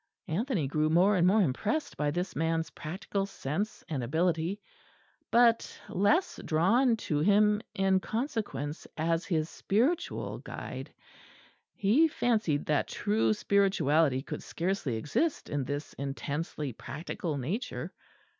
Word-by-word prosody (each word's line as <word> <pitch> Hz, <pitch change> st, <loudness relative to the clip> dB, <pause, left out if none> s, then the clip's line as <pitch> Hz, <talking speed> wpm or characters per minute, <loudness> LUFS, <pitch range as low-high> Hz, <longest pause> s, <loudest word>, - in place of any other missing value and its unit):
Anthony 200 Hz, -, 0 dB
grew 155 Hz, +3 st, +1 dB
more 180 Hz, +6 st, +4 dB
and 180 Hz, -1 st, +4 dB
more 205 Hz, +2 st, +5 dB
impressed 210 Hz, -, -1 dB
by 150 Hz, -1 st, 0 dB
this 175 Hz, +5 st, -2 dB
man's 165 Hz, +1 st, 0 dB
practical 195 Hz, +4 st, -3 dB
sense 195 Hz, +5 st, -3 dB
and 140 Hz, -6 st, -2 dB
ability; 165 Hz, -, 0 dB, 0.7 s
but 235 Hz, -1 st, +3 dB
less 215 Hz, -, +2 dB
drawn 225 Hz, +10 st, +3 dB
to 150 Hz, -8 st, -1 dB
him 210 Hz, +4 st, +4 dB
in 190 Hz, 0 st, +3 dB
consequence 215 Hz, -, -3 dB
as 165 Hz, +2 st, 0 dB
his 160 Hz, -4 st, 0 dB
spiritual 245 Hz, -, -1 dB
guide. -, -, -7 dB, 0.8 s
He 235 Hz, +12 st, +4 dB
fancied 220 Hz, -, 0 dB
that 150 Hz, -, +1 dB
true 110 Hz, +1 st, +1 dB
spirituality 160 Hz, -, +2 dB
could -, -, -6 dB
scarcely 170 Hz, -, -2 dB
exist 215 Hz, -, -1 dB
in 145 Hz, -2 st, -1 dB
this 145 Hz, +3 st, -4 dB
intensely 140 Hz, +1 st, -4 dB
practical 150 Hz, +5 st, -5 dB
nature. 185 Hz, -, -4 dB
170 Hz, 120 wpm, -30 LUFS, 150-210 Hz, 0.8 s, more